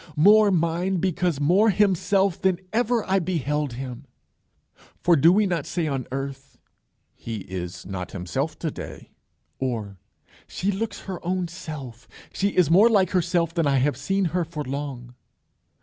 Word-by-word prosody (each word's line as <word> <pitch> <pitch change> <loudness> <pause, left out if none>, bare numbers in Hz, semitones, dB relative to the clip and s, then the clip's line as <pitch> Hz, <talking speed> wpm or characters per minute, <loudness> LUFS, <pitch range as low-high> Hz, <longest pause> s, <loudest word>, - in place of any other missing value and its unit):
more 205 +7 +6
mine 175 +1 +1
because 175 -3 0
more 185 +10 +4
himself 195 -1 +2
than 190 -2 +2
ever 240 0 +1
I 190 +1 +3
beheld 150 -6 -1
him!" 130 +1 -7 1.0
For 175 - +5
do 165 +4 +6
we 210 +3 +3
not 175 -6 -2
say 170 -3 -1
on 135 -4 -2
earth, 135 0 -6 0.6
"He 115 -3 -6
is 90 -2 -6
not 90 -2 -5
himself 90 -3 -3
to - - -3
day," - - -9 0.5
or 110 -7 -3 0.5
"She 195 +3 -1
looks 205 +1 -4
her 185 -3 -7
own 180 0 -1
self;" 140 -8 -8 0.3
"She 200 - +1
is 180 -5 +2
more 205 +7 +7
like 195 -5 +3
herself 170 -2 +1
than 165 -3 +1
I 140 -1 +3
have 135 +1 +2
seen 195 +9 0
her 180 -1 +1
for 160 -2 -5
long"? 135 -3 -5
165 Hz, 155 wpm, -24 LUFS, 135-190 Hz, 1.0 s, more